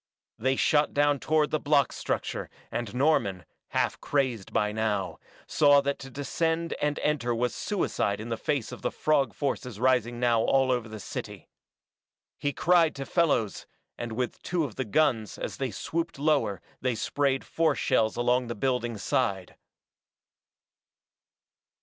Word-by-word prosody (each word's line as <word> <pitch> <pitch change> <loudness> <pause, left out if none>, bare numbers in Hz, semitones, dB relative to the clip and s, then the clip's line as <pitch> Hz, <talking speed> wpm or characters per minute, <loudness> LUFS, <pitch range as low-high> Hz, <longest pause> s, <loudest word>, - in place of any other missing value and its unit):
They 130 +3 +2
shot 150 +2 +2
down 145 -1 +3
toward 155 +1 +1
the 155 - +1
block 145 -2 +3
structure, - - -3 0.2
and 120 -1 -4
Norman, 120 - +1 0.2
half - - -1
crazed 130 -8 -1
by 105 0 +1
now, 105 -4 -1 0.3
saw 145 -1 +5
that 140 0 -2
to 135 - -9
descend 165 +5 -1
and 150 0 0
enter 125 -6 +1
was 120 +1 0
suicide 105 - -1
in 110 +2 -6
the 115 - 0
face 140 0 -2
of - - -8
the - - 0
frog 140 -6 +1
forces 125 -6 -3
rising 120 -2 +2
now 120 -2 +3
over - - 0
all 130 -2 +3
the 110 -1 -9
city. - - -7 0.9
He 145 - 0
cried 170 +2 +3
to 135 - -5
Fellows, 140 - +1 0.3
and 120 -1 -5
with 125 +2 -3
two 175 -2 -1
of 135 -7 -4
the 130 - -3
guns 115 -2 +1
as - - -5
they 135 -1 -1
swooped 165 - -3
lower 140 -9 +1 0.2
they 130 -2 0
sprayed 135 +3 0
force 160 -5 +1
shells 110 -1 +2
along 125 +1 +1
the 120 - -4
building's 120 -2 -1
side. 95 -2 -1
130 Hz, 155 wpm, -28 LUFS, 115-145 Hz, 0.9 s, saw